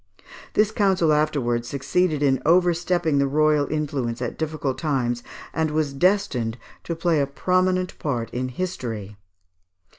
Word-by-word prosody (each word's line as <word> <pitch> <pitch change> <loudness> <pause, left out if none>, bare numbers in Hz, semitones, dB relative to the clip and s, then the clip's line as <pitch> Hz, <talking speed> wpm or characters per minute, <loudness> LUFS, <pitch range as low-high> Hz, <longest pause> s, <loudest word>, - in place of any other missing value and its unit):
This 210 0 +3
council 190 -7 +2
afterwards 135 -6 0
succeeded 150 +3 0
in 135 -2 +2
overstepping 175 -2 +2
the 140 - +2
royal 150 0 +2
influence 140 -6 -2
at 125 -1 -3
difficult 150 -4 -3
times, 125 -6 0 0.3
and 160 -1 0
was 150 -2 -1
destined 135 - +1 0.3
to 170 - -2
play 165 -1 +1
a 140 - 0
prominent 185 +5 0
part 120 -6 -2
in 130 +1 -2
history. 120 - -5
150 Hz, 130 wpm, -23 LUFS, 130-175 Hz, 0.3 s, This